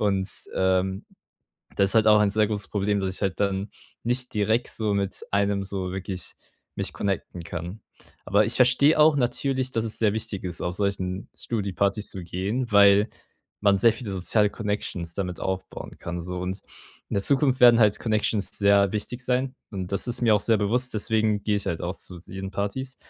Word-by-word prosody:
Und, 100 Hz, -2 st, +1 dB, 0.3 s
ähm, 95 Hz, +1 st, +1 dB, 0.7 s
das 100 Hz, +1 st, +2 dB
halt 110 Hz, -1 st, +4 dB
auch 105 Hz, 0 st, +7 dB
ein 105 Hz, -1 st, +3 dB
sehr 110 Hz, +1 st, +2 dB
großes 105 Hz, -2 st, -3 dB
Problem, 100 Hz, 0 st, 0 dB
dass 95 Hz, -, -1 dB
ich -, -, -10 dB
halt 95 Hz, -2 st, -1 dB
dann 100 Hz, 0 st, 0 dB, 0.3 s
nicht 125 Hz, +1 st, -1 dB
direkt 110 Hz, +3 st, +1 dB
so 105 Hz, -2 st, -1 dB
mit 100 Hz, -1 st, -2 dB
einem 100 Hz, 0 st, +1 dB
so 95 Hz, -1 st, -4 dB
wirklich 95 Hz, -1 st, -6 dB, 0.4 s
mich -, -, -2 dB
connecten 95 Hz, -3 st, -3 dB
kann. 90 Hz, +4 st, -6 dB, 0.5 s
Aber 100 Hz, +3 st, +4 dB
ich -, -, -1 dB
verstehe 130 Hz, +5 st, +4 dB
auch 150 Hz, 0 st, +6 dB
natürlich, 130 Hz, 0 st, 0 dB
dass 115 Hz, -1 st, 0 dB
es 110 Hz, -, 0 dB
sehr 105 Hz, -3 st, +3 dB
wichtig 110 Hz, -3 st, -4 dB
ist, 90 Hz, -3 st, -3 dB
auf 90 Hz, +1 st, -3 dB
solchen 95 Hz, -2 st, -2 dB
Studi-Partys 100 Hz, -1 st, -2 dB
zu 95 Hz, -, -6 dB
gehen, 100 Hz, +9 st, -3 dB
weil 100 Hz, +1 st, +6 dB, 0.5 s
man 100 Hz, -1 st, +4 dB
sehr 115 Hz, +4 st, +5 dB
viele 115 Hz, -5 st, -6 dB
soziale 100 Hz, +3 st, +2 dB
Connections 105 Hz, -6 st, -3 dB
damit 90 Hz, -3 st, -3 dB
aufbauen 95 Hz, 0 st, -5 dB
kann 85 Hz, 0 st, -5 dB
so, 90 Hz, +1 st, -5 dB
und 95 Hz, +2 st, -4 dB, 0.5 s
in -, -, -2 dB
der 100 Hz, -, +1 dB
Zukunft 135 Hz, +1 st, +2 dB
werden 120 Hz, -1 st, +8 dB
halt 105 Hz, -2 st, +4 dB
Connections 110 Hz, -2 st, 0 dB
sehr 100 Hz, -1 st, +4 dB
wichtig 120 Hz, +4 st, -4 dB
sein, 130 Hz, +1 st, 0 dB, 0.2 s
und 95 Hz, -2 st, -5 dB
das 100 Hz, -, +2 dB
ist 120 Hz, -, -2 dB
mir 115 Hz, -3 st, +5 dB
auch 105 Hz, -, +2 dB
sehr 110 Hz, +2 st, +2 dB
bewusst, 120 Hz, +5 st, 0 dB
deswegen 110 Hz, -1 st, +1 dB
gehe 105 Hz, -1 st, +1 dB
ich 100 Hz, -, -3 dB
halt 85 Hz, -, -2 dB
auch 90 Hz, +2 st, -2 dB
zu 90 Hz, -2 st, -10 dB
diesen 95 Hz, +2 st, -7 dB
Partys. 130 Hz, +7 st, -3 dB
100 Hz, 190 wpm, -25 LUFS, 95-110 Hz, 0.7 s, werden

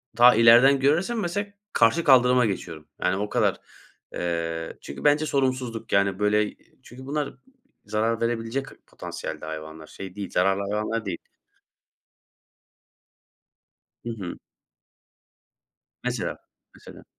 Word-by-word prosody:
Ta 120 Hz, -1 st, +7 dB
ileriden 120 Hz, +4 st, +7 dB
görürsem 175 Hz, -, +1 dB
mesela 205 Hz, +2 st, -2 dB, 0.3 s
karşı 120 Hz, +9 st, +3 dB
kaldırıma 125 Hz, -3 st, +5 dB
geçiyorum. 80 Hz, -6 st, -5 dB
Yani, 90 Hz, +1 st, +1 dB
o 105 Hz, +1 st, -3 dB
kadar. -, -, +1 dB, 0.5 s
Eee, 85 Hz, -1 st, -3 dB
çünkü 70 Hz, -, -9 dB
bence 150 Hz, +1 st, +4 dB
sorumsuzluk, 130 Hz, -5 st, -1 dB
yani, 100 Hz, 0 st, +2 dB
böyle, 105 Hz, 0 st, +1 dB, 0.3 s
çünkü 130 Hz, +2 st, -12 dB
bunlar 145 Hz, +1 st, -2 dB, 0.5 s
zarar 110 Hz, +2 st, -1 dB
verebilecek 115 Hz, +3 st, -1 dB, 0.2 s
potansiyelde -, -, -7 dB
hayvanlar, 80 Hz, 0 st, -8 dB
şey 95 Hz, -1 st, -9 dB
değil, 100 Hz, -2 st, -6 dB
zararlı 95 Hz, +2 st, +2 dB
hayvanlar 110 Hz, +1 st, -2 dB
değil. 90 Hz, -3 st, -3 dB, 2.9 s
Hı 120 Hz, -, -4 dB
hı. 100 Hz, -6 st, -6 dB, 1.7 s
Mesela. -, -, -2 dB, 0.4 s
Mesela. -, -, -14 dB
115 Hz, 110 wpm, -25 LUFS, 95-130 Hz, 2.9 s, Ta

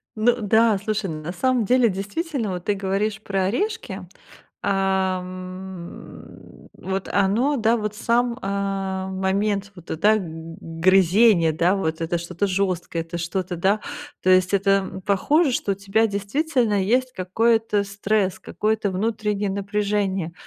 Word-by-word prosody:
Ну 235 Hz, +2 st, +3 dB
да, 220 Hz, +1 st, +4 dB
слушай, 210 Hz, 0 st, -2 dB
ну 155 Hz, -1 st, -5 dB
на 165 Hz, -, -4 dB
самом 250 Hz, +3 st, +1 dB
деле 245 Hz, 0 st, +4 dB
действительно 220 Hz, -, -3 dB
вот 180 Hz, -1 st, -5 dB
ты 205 Hz, -, +2 dB
говоришь 200 Hz, +2 st, -1 dB
про 195 Hz, -2 st, -1 dB
орешки, 215 Hz, -, -2 dB, 0.6 s
а, 190 Hz, -1 st, +1 dB
м, 185 Hz, -1 st, -10 dB
вот 190 Hz, 0 st, -4 dB
оно, 215 Hz, +9 st, +2 dB
да, 230 Hz, 0 st, +2 dB
вот 210 Hz, -1 st, -3 dB
сам, 235 Hz, +2 st, +1 dB
а, 195 Hz, -1 st, -2 dB
момент 195 Hz, +1 st, -1 dB
вот 175 Hz, -2 st, -14 dB
это 210 Hz, +7 st, +3 dB
г 165 Hz, -2 st, -8 dB
грызение, 185 Hz, +1 st, +4 dB
да, 175 Hz, +4 st, +2 dB
вот 160 Hz, -4 st, -2 dB
это 170 Hz, +1 st, 0 dB
что-то 170 Hz, +3 st, -2 dB
жёсткое, 185 Hz, -3 st, -1 dB
это 170 Hz, +1 st, -6 dB
что-то, 175 Hz, +2 st, -3 dB
да, 195 Hz, +5 st, +2 dB, 0.4 s
то 185 Hz, -, +2 dB
есть 185 Hz, +1 st, +4 dB
это, 195 Hz, 0 st, +3 dB
м, 190 Hz, -1 st, 0 dB
похоже, 270 Hz, -, +2 dB
что 205 Hz, -, 0 dB
у -, -, -9 dB
тебя 200 Hz, +3 st, +1 dB
действительно 215 Hz, +1 st, 0 dB
есть 255 Hz, +5 st, +1 dB
какой-то 220 Hz, +2 st, +1 dB
стресс, 200 Hz, -1 st, 0 dB
какое-то 215 Hz, -1 st, -1 dB
внутреннее 210 Hz, 0 st, -1 dB
напряжение. 200 Hz, -3 st, -1 dB
195 Hz, 145 wpm, -23 LUFS, 185-215 Hz, 0.6 s, да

